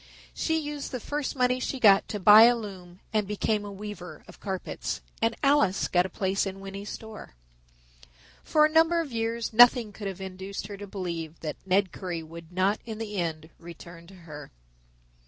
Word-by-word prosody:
She 320 Hz, -1 st, 0 dB
used 295 Hz, -2 st, -5 dB
the 255 Hz, -, -3 dB
first 290 Hz, +4 st, -3 dB
money 250 Hz, -1 st, +2 dB
she 265 Hz, +1 st, -3 dB
got 200 Hz, -4 st, +6 dB
to 210 Hz, -, -4 dB
buy 210 Hz, +3 st, +9 dB
a 240 Hz, +1 st, +5 dB
loom 190 Hz, -5 st, -9 dB
and 210 Hz, -2 st, +1 dB
became 210 Hz, +1 st, -1 dB
a 205 Hz, -, -7 dB
weaver 200 Hz, -2 st, -8 dB
of -, -, -14 dB
carpets, 190 Hz, -2 st, -4 dB, 0.2 s
and 225 Hz, 0 st, +1 dB
Alice 275 Hz, -9 st, +3 dB
got 180 Hz, +1 st, +2 dB
a -, -, -16 dB
place 190 Hz, +2 st, -1 dB
in 195 Hz, 0 st, -6 dB
Winney's 195 Hz, +1 st, -7 dB
store. 220 Hz, -, -9 dB, 1.1 s
For 305 Hz, -1 st, +4 dB
a 310 Hz, -, 0 dB
number 325 Hz, +1 st, +4 dB
of 305 Hz, -5 st, -7 dB
years 230 Hz, 0 st, -2 dB
nothing 240 Hz, -2 st, +6 dB
could 205 Hz, 0 st, -6 dB
have 195 Hz, -1 st, -6 dB
induced 190 Hz, +1 st, -6 dB
her 200 Hz, 0 st, -8 dB
to 205 Hz, +1 st, -8 dB
believe 170 Hz, -5 st, -5 dB
that 155 Hz, -2 st, -5 dB
Ned 190 Hz, 0 st, +2 dB
Currie 175 Hz, -4 st, -5 dB
would 165 Hz, +1 st, -11 dB
not 190 Hz, +3 st, +1 dB
in 220 Hz, -2 st, -7 dB
the 210 Hz, -2 st, -5 dB
end 160 Hz, -2 st, -3 dB
return 170 Hz, 0 st, -12 dB
to 195 Hz, -, -14 dB
her. 150 Hz, -5 st, -11 dB
200 Hz, 190 wpm, -27 LUFS, 180-225 Hz, 1.1 s, buy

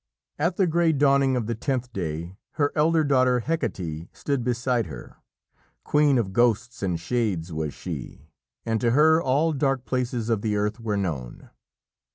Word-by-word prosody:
At 170 Hz, +4 st, 0 dB
the 195 Hz, -, +4 dB
grey 170 Hz, -1 st, +2 dB
dawning 140 Hz, -2 st, +3 dB
of 120 Hz, -3 st, -1 dB
the 115 Hz, -, -2 dB
tenth 125 Hz, +1 st, -3 dB
day 85 Hz, -1 st, -4 dB, 0.2 s
her 145 Hz, -1 st, +1 dB
elder 160 Hz, +1 st, +3 dB
daughter, 130 Hz, -3 st, +3 dB
Hecate, 90 Hz, -, -3 dB
stood 140 Hz, -4 st, -1 dB
beside 120 Hz, -1 st, 0 dB
her. -, -, -10 dB, 0.7 s
Queen 150 Hz, -2 st, +3 dB
of 100 Hz, -5 st, -1 dB
ghosts 120 Hz, +1 st, +1 dB
and 90 Hz, -4 st, -1 dB
shades 90 Hz, -4 st, -2 dB
was 80 Hz, -2 st, -3 dB
she, 75 Hz, +4 st, -8 dB, 0.3 s
and 115 Hz, -1 st, 0 dB
to 120 Hz, -, +2 dB
her 160 Hz, +2 st, +5 dB
all 150 Hz, +4 st, +2 dB
dark 135 Hz, -2 st, 0 dB
places 125 Hz, -3 st, -2 dB
of 110 Hz, -3 st, +1 dB
the 105 Hz, -1 st, -1 dB
earth 105 Hz, +2 st, -1 dB
were 110 Hz, -3 st, -2 dB
known. 75 Hz, -11 st, -4 dB
120 Hz, 165 wpm, -25 LUFS, 100-140 Hz, 0.7 s, her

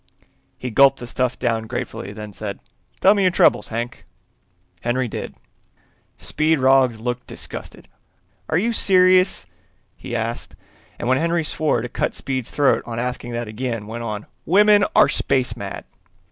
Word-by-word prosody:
He 125 Hz, -, -5 dB
gulped 135 Hz, +4 st, +5 dB
the 120 Hz, -, -7 dB
stuff 125 Hz, 0 st, -1 dB
down 115 Hz, -3 st, -1 dB
gratefully, 100 Hz, -, -5 dB
then 105 Hz, 0 st, -8 dB
said, 100 Hz, -1 st, -6 dB, 0.4 s
"Tell 195 Hz, -, +7 dB
me 205 Hz, -, 0 dB
your 185 Hz, -, +4 dB
troubles, 175 Hz, -, +3 dB
Hank." 120 Hz, +2 st, -5 dB, 0.8 s
Henry 125 Hz, +1 st, 0 dB
did. -, -, -6 dB, 0.8 s
Speed 155 Hz, +1 st, +1 dB
Roggs 130 Hz, -3 st, +3 dB
looked 125 Hz, +2 st, -4 dB
disgusted. -, -, -9 dB, 0.6 s
"Are 160 Hz, -, +2 dB
you 230 Hz, +6 st, +1 dB
serious?" 185 Hz, -, +4 dB, 0.5 s
he 120 Hz, -, -7 dB
asked, 115 Hz, +1 st, -4 dB, 0.4 s
and 120 Hz, -, -4 dB
when 130 Hz, +1 st, +3 dB
Henry 170 Hz, +1 st, +1 dB
swore 150 Hz, -5 st, 0 dB
to -, -, -3 dB
cut -, -, -2 dB
Speed's 130 Hz, -3 st, -3 dB
throat 145 Hz, -2 st, +2 dB
on 115 Hz, -1 st, -6 dB
asking 125 Hz, 0 st, -3 dB
that 120 Hz, -1 st, -3 dB
again, 115 Hz, 0 st, -4 dB
went 115 Hz, +2 st, -6 dB
on, 105 Hz, -2 st, -4 dB, 0.2 s
"Women 205 Hz, +3 st, +5 dB
are -, -, +7 dB
space 130 Hz, -2 st, 0 dB
mad!" -, -, -7 dB
125 Hz, 155 wpm, -21 LUFS, 115-155 Hz, 0.8 s, Tell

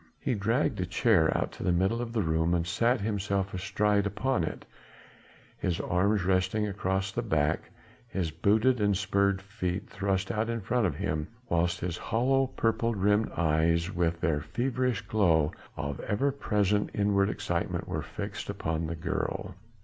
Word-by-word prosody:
He -, -, -1 dB
dragged 110 Hz, 0 st, 0 dB
a -, -, 0 dB
chair 100 Hz, -5 st, +3 dB
out -, -, -1 dB
to -, -, -8 dB
the 90 Hz, -, +2 dB
middle 95 Hz, +7 st, +1 dB
of 120 Hz, -1 st, -4 dB
the 115 Hz, -3 st, 0 dB
room 80 Hz, +1 st, +1 dB
and 85 Hz, -1 st, 0 dB
sat 115 Hz, +7 st, +1 dB
himself 100 Hz, -2 st, -1 dB
astride 100 Hz, +2 st, +1 dB
upon 110 Hz, +1 st, 0 dB
it, -, -, -5 dB, 0.9 s
his 85 Hz, -2 st, -1 dB
arms 100 Hz, +3 st, +1 dB
resting 95 Hz, +3 st, +1 dB
across 95 Hz, -1 st, -1 dB
the 120 Hz, -, -2 dB
back, 75 Hz, -10 st, 0 dB, 0.4 s
his 90 Hz, -7 st, -2 dB
booted 110 Hz, -, +2 dB
and 100 Hz, -2 st, +3 dB
spurred 100 Hz, 0 st, +1 dB
feet 100 Hz, -2 st, -3 dB
thrust 95 Hz, -1 st, -1 dB
out 110 Hz, +2 st, -1 dB
in 115 Hz, 0 st, -1 dB
front 115 Hz, +3 st, +1 dB
of -, -, -3 dB
him, 75 Hz, 0 st, -2 dB, 0.2 s
whilst 85 Hz, +1 st, +1 dB
his 85 Hz, -1 st, -2 dB
hollow, 135 Hz, +4 st, +1 dB
purple 115 Hz, -2 st, 0 dB
rimmed 105 Hz, +2 st, +2 dB
eyes 85 Hz, +2 st, +2 dB
with 85 Hz, -1 st, 0 dB
their 75 Hz, -4 st, +1 dB
feverish 125 Hz, -, -1 dB
glow 85 Hz, -8 st, +2 dB, 0.3 s
of 70 Hz, -1 st, -3 dB
ever 135 Hz, +7 st, 0 dB
present 105 Hz, -6 st, +1 dB
inward 100 Hz, -1 st, +2 dB
excitement -, -, -2 dB
were -, -, -2 dB
fixed -, -, -6 dB
upon 80 Hz, 0 st, -2 dB
the 85 Hz, -, -3 dB
girl. 90 Hz, +3 st, -3 dB
100 Hz, 165 wpm, -29 LUFS, 85-110 Hz, 0.9 s, chair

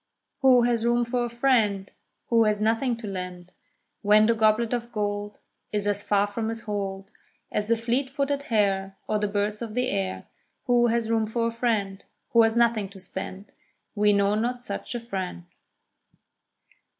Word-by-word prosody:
Who 255 Hz, -3 st, +6 dB
has 235 Hz, -2 st, +1 dB
room 240 Hz, 0 st, +2 dB
for 240 Hz, 0 st, -1 dB
a -, -, -4 dB
friend 230 Hz, -6 st, +1 dB, 0.4 s
Who 230 Hz, -1 st, +4 dB
has 210 Hz, -1 st, +2 dB
nothing 225 Hz, +3 st, +1 dB
to 230 Hz, -2 st, -7 dB
lend, 180 Hz, -2 st, -6 dB, 0.5 s
When 210 Hz, +1 st, +5 dB
the 230 Hz, -, +4 dB
goblet 220 Hz, +1 st, +2 dB
of 240 Hz, 0 st, -3 dB
gold 205 Hz, -1 st, -3 dB, 0.3 s
Is 205 Hz, -1 st, -1 dB
as 205 Hz, 0 st, 0 dB
far 205 Hz, 0 st, +2 dB
from 220 Hz, +2 st, -3 dB
his 225 Hz, 0 st, -5 dB
hold 195 Hz, -2 st, -4 dB, 0.4 s
As 210 Hz, -, -1 dB
the 230 Hz, 0 st, +2 dB
fleet 245 Hz, +4 st, -1 dB
footed 280 Hz, +1 st, -1 dB
hare, 195 Hz, -6 st, 0 dB
Or 215 Hz, -, 0 dB
the 210 Hz, -, 0 dB
birds 205 Hz, +1 st, -2 dB
of 225 Hz, -2 st, -5 dB
the 250 Hz, 0 st, +1 dB
air. 195 Hz, -1 st, -2 dB, 0.4 s
Who 240 Hz, -2 st, +4 dB
has 230 Hz, -1 st, 0 dB
room 220 Hz, -1 st, +1 dB
for 230 Hz, +1 st, -1 dB
a 230 Hz, -, 0 dB
friend 215 Hz, -5 st, -1 dB, 0.3 s
Who 230 Hz, -, +6 dB
has 225 Hz, 0 st, +3 dB
nothing 230 Hz, -4 st, +2 dB
to 195 Hz, 0 st, -13 dB
spend? 190 Hz, +2 st, -7 dB, 0.4 s
We 210 Hz, -1 st, +3 dB
know 200 Hz, 0 st, +3 dB
not 240 Hz, +3 st, -1 dB
such 245 Hz, -, -5 dB
a -, -, -1 dB
friend. 190 Hz, -6 st, -5 dB
220 Hz, 175 wpm, -26 LUFS, 205-235 Hz, 0.5 s, Who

